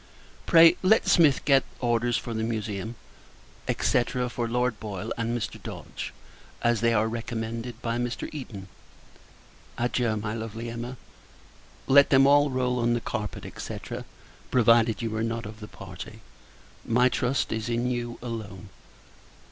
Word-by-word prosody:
Pray, 165 Hz, 0 st, +8 dB
let 200 Hz, +2 st, +4 dB
Smith 165 Hz, -8 st, +5 dB
get 135 Hz, -2 st, +5 dB, 0.2 s
orders 120 Hz, 0 st, +1 dB
for 120 Hz, -, -5 dB
the 110 Hz, -, -2 dB
Museum, 110 Hz, -1 st, -3 dB, 0.7 s
&c. 125 Hz, -, +2 dB, 0.3 s
for 120 Hz, 0 st, -2 dB
Lord 125 Hz, -1 st, 0 dB
Boyle 105 Hz, 0 st, -4 dB
and 115 Hz, +1 st, -1 dB
Mr. 115 Hz, -, -5 dB
Dodge, -, -, -7 dB, 0.5 s
as 120 Hz, -2 st, +2 dB
they 115 Hz, 0 st, +3 dB
are 110 Hz, -1 st, +2 dB
recommended 115 Hz, 0 st, -4 dB
by 115 Hz, 0 st, -1 dB
Mr. 120 Hz, 0 st, -3 dB
Eden. 110 Hz, -10 st, -7 dB, 1.1 s
Adieu, 120 Hz, -2 st, 0 dB
my 105 Hz, 0 st, -3 dB
lovely 115 Hz, +1 st, -5 dB
Emma! 120 Hz, +2 st, -6 dB, 0.9 s
Let 140 Hz, +1 st, +6 dB
them 135 Hz, 0 st, +6 dB
all 145 Hz, +1 st, +5 dB
roll 125 Hz, -1 st, 0 dB
on 120 Hz, 0 st, +2 dB
the -, -, 0 dB
carpet, 110 Hz, -2 st, -4 dB, 0.2 s
&c. -, -, -5 dB, 0.7 s
provided 115 Hz, -1 st, +4 dB
you 110 Hz, -1 st, -2 dB
are 110 Hz, -, -1 dB
not 115 Hz, 0 st, -2 dB
of 105 Hz, +1 st, -9 dB
the 105 Hz, -, -8 dB
party. -, -, -10 dB, 0.6 s
My 125 Hz, +2 st, +3 dB
trust 130 Hz, +1 st, 0 dB
is 110 Hz, +1 st, -2 dB
in 120 Hz, +1 st, 0 dB
you 120 Hz, -1 st, -3 dB
alone. 105 Hz, -5 st, -6 dB
115 Hz, 145 wpm, -27 LUFS, 110-125 Hz, 1.1 s, Pray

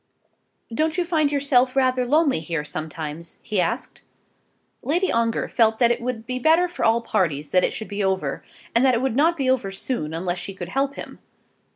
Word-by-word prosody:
"Don't 315 Hz, +6 st, 0 dB
you 355 Hz, -, +1 dB
find 310 Hz, -4 st, +1 dB
yourself 270 Hz, -3 st, +2 dB
rather 255 Hz, -1 st, +2 dB
lonely 295 Hz, -, +3 dB
here 160 Hz, -1 st, -3 dB
sometimes?" 155 Hz, +1 st, -6 dB
he 210 Hz, -4 st, 0 dB
asked. 205 Hz, +10 st, -3 dB, 0.8 s
Lady 350 Hz, +6 st, 0 dB
Ongar 230 Hz, 0 st, 0 dB
felt 220 Hz, -1 st, +2 dB
that 235 Hz, 0 st, +4 dB
it 240 Hz, -, -1 dB
would 235 Hz, -2 st, -4 dB
be 255 Hz, +1 st, -3 dB
better 325 Hz, +6 st, +4 dB
for 350 Hz, -, -5 dB
all 225 Hz, +1 st, +3 dB
parties 155 Hz, -10 st, -1 dB
that 185 Hz, -, +4 dB
it -, -, +2 dB
should 220 Hz, -, -6 dB
be 205 Hz, 0 st, -3 dB
over, 190 Hz, -1 st, -1 dB, 0.3 s
and 235 Hz, -, +3 dB
that 260 Hz, -2 st, +4 dB
it 235 Hz, -, 0 dB
would 265 Hz, -4 st, 0 dB
not 325 Hz, +5 st, +3 dB
be 270 Hz, -3 st, -1 dB
over 250 Hz, -7 st, +1 dB
soon 195 Hz, -5 st, -3 dB
unless 175 Hz, +2 st, -2 dB
she 195 Hz, +2 st, -7 dB
could 175 Hz, -2 st, -7 dB
help 275 Hz, +5 st, -1 dB
him. -, -, -9 dB
235 Hz, 200 wpm, -23 LUFS, 185-275 Hz, 0.8 s, that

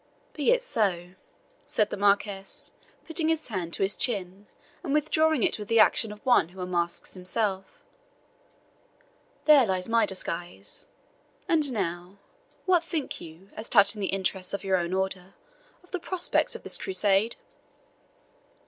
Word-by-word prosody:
"Be 300 Hz, -, 0 dB
it -, -, +3 dB
so," 185 Hz, -, 0 dB, 0.6 s
said 215 Hz, -, +1 dB
the -, -, -2 dB
Marquis, 200 Hz, -1 st, +1 dB, 0.6 s
putting 325 Hz, -1 st, 0 dB
his 320 Hz, -3 st, 0 dB
hand 180 Hz, -6 st, -4 dB
to -, -, 0 dB
his 195 Hz, -, +2 dB
chin, 200 Hz, -3 st, -1 dB, 0.4 s
and 295 Hz, -4 st, -1 dB
withdrawing 310 Hz, -2 st, +2 dB
it -, -, +1 dB
with 210 Hz, -, -7 dB
the 230 Hz, +1 st, +3 dB
action 215 Hz, 0 st, +4 dB
of 210 Hz, -, -12 dB
one 245 Hz, -10 st, +4 dB
who 185 Hz, +1 st, -14 dB
unmasks 175 Hz, -1 st, -3 dB
himself; 190 Hz, +1 st, -3 dB, 1.6 s
"there 300 Hz, -3 st, +7 dB
lies 185 Hz, -1 st, -1 dB
my 230 Hz, -2 st, +3 dB
disguise. 175 Hz, -2 st, -5 dB, 0.6 s
And 305 Hz, -4 st, +3 dB
now, 180 Hz, -3 st, -4 dB, 0.5 s
what 360 Hz, -2 st, +3 dB
think 325 Hz, -4 st, -4 dB
you, 170 Hz, +5 st, -13 dB
as 220 Hz, -, -6 dB
touching 205 Hz, -1 st, +4 dB
the 195 Hz, -, 0 dB
interests 190 Hz, 0 st, -2 dB
of 200 Hz, -, -7 dB
your 190 Hz, -1 st, +2 dB
own 170 Hz, 0 st, -2 dB
order, 190 Hz, 0 st, -3 dB, 0.5 s
of 360 Hz, -, -23 dB
the 365 Hz, -, -2 dB
prospects 355 Hz, +1 st, 0 dB
of -, -, -9 dB
this -, -, -1 dB
Crusade?" 215 Hz, -, +1 dB
200 Hz, 150 wpm, -27 LUFS, 185-275 Hz, 1.6 s, there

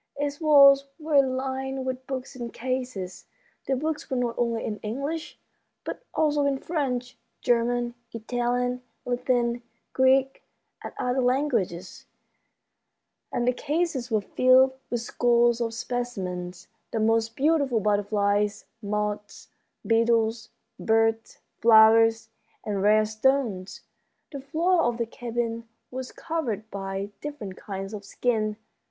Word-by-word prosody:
Its 285 Hz, +2 st, -3 dB
walls 280 Hz, -2 st, +7 dB
were 305 Hz, -3 st, +3 dB
lined 265 Hz, 0 st, -3 dB
with 260 Hz, 0 st, -4 dB
books 265 Hz, 0 st, -5 dB
and 240 Hz, -2 st, -6 dB
cases. 245 Hz, -8 st, -4 dB, 0.4 s
The 270 Hz, -, +2 dB
books 305 Hz, +3 st, -3 dB
were 260 Hz, -, -1 dB
not 245 Hz, -1 st, 0 dB
only 235 Hz, -1 st, -1 dB
in 210 Hz, -, -3 dB
English, 280 Hz, +10 st, -4 dB, 0.5 s
but -, -, -6 dB
also 295 Hz, -2 st, +2 dB
in 275 Hz, -1 st, +1 dB
French, 260 Hz, -6 st, -3 dB, 0.2 s
German, 240 Hz, 0 st, +1 dB, 0.2 s
Italian, 245 Hz, +2 st, -1 dB, 0.2 s
Latin, 245 Hz, -1 st, 0 dB, 0.3 s
Greek, 265 Hz, +1 st, +3 dB, 0.4 s
and -, -, -6 dB
other 250 Hz, +1 st, 0 dB
languages, 245 Hz, -9 st, -1 dB, 1.2 s
and 240 Hz, -, -1 dB
the 250 Hz, -, +4 dB
cases 295 Hz, -2 st, -1 dB
were 215 Hz, -2 st, +1 dB
filled 255 Hz, +5 st, +4 dB, 0.2 s
with 240 Hz, -1 st, -1 dB
scores 240 Hz, 0 st, +2 dB
of 230 Hz, -1 st, -1 dB
specimens, 185 Hz, -8 st, -4 dB, 0.2 s
the 225 Hz, -, -2 dB
most 225 Hz, +1 st, +1 dB
beautiful 280 Hz, -5 st, +2 dB
butterflies, 205 Hz, 0 st, +1 dB, 0.2 s
moths, 210 Hz, 0 st, -3 dB, 0.4 s
beetles, 225 Hz, 0 st, +2 dB, 0.3 s
birds, 225 Hz, 0 st, +1 dB, 0.2 s
flowers, 225 Hz, 0 st, +6 dB, 0.4 s
and 205 Hz, -2 st, -2 dB
rare 215 Hz, +2 st, +4 dB
stones. 215 Hz, -3 st, 0 dB, 0.5 s
The 280 Hz, -3 st, -6 dB
floor 335 Hz, +6 st, +1 dB
of 240 Hz, -4 st, 0 dB
the 235 Hz, -, -1 dB
cabin 230 Hz, 0 st, -4 dB, 0.2 s
was 255 Hz, 0 st, -6 dB
covered 245 Hz, -, -4 dB
by 195 Hz, +1 st, -4 dB
different 255 Hz, -11 st, -6 dB
kinds 195 Hz, 0 st, -6 dB
of 205 Hz, -1 st, -6 dB
skins. 215 Hz, 0 st, -1 dB
240 Hz, 120 wpm, -26 LUFS, 220-265 Hz, 1.2 s, walls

